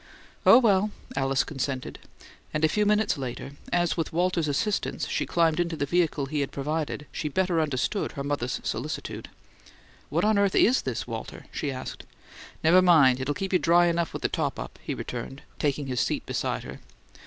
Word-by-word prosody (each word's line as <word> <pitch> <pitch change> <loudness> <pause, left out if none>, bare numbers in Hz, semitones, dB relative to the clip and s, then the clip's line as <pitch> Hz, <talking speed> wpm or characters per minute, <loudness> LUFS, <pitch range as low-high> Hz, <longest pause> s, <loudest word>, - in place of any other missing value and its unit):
"Oh, - - +10
well," 210 -4 +4 0.3
Alice 135 0 +1
consented; 135 -2 -4 0.6
and 155 +1 +3
a - - +3
few 210 +3 +1
minutes 210 -6 +2
later, 130 +1 -5 0.2
as 175 -1 +2
with 165 -2 -2
Walter's 175 -1 +1
assistance 195 +9 -1
she - - -1
climbed 165 -1 +2
into 170 -1 0
the 145 - -1
vehicle 160 -3 +1
he 150 +2 -3
had 140 - -1
provided, 150 +1 -3
she 150 - -3
better 180 +1 +1
understood 150 +7 -1
her 140 - -4
mother's 140 -3 -2
solicitude. - - -4 0.8
"What 170 +6 +1
on 215 -1 +3
earth 200 -1 +2
IS 255 +3 +4
this, 120 -3 -3
Walter?" 115 -2 -7
she 145 - -2
asked. 130 -1 -6 0.6
"Never 170 +4 +6
mind; 150 -8 +6
it'll 145 +2 -1
keep 195 -1 -3
you 180 - +5
dry 175 +1 +5
enough 170 -1 0
with - - -6
the - - +3
top - - -2
up," - - -7
he - - -4
returned, 135 +1 -6 0.2
taking 145 -1 0
his 130 -2 -2
seat - - -1
beside - - -2
her. - - -9
160 Hz, 185 wpm, -27 LUFS, 140-180 Hz, 0.8 s, Oh